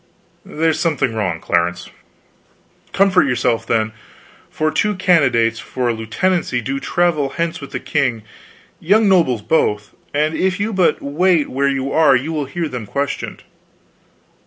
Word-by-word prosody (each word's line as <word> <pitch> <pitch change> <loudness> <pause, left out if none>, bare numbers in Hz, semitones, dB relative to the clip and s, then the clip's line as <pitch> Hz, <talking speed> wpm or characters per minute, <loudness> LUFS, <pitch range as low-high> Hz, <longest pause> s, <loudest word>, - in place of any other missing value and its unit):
"There's 160 0 0
something 140 -7 0
wrong, 95 -7 -2
Clarence." 85 +1 -1 1.0
"Comfort 190 -4 +3
yourself, 120 -2 0
then; 110 -1 0 0.6
for 155 0 -1
two 210 +4 0
candidates 130 -11 +2
for 125 -1 -3
a - - +1
lieutenancy 125 +6 -1
do 135 +4 -3
travel 160 -3 0
hence 170 -2 -2
with 140 - -8
the - - -4
king 130 -7 -1 0.6
young 210 +5 +3
nobles 160 - +2
both 105 -9 0 0.2
and 150 +2 0
if 185 +3 0
you 220 +2 -1
but 185 -3 +1
wait 160 +2 +1
where 140 +2 +1
you 135 0 -2
are 155 -4 +4
you 140 +6 -2
will 150 -2 -2
hear 165 +4 -3
them 125 -6 -6
questioned." 140 +4 -4
140 Hz, 145 wpm, -18 LUFS, 120-170 Hz, 1.0 s, are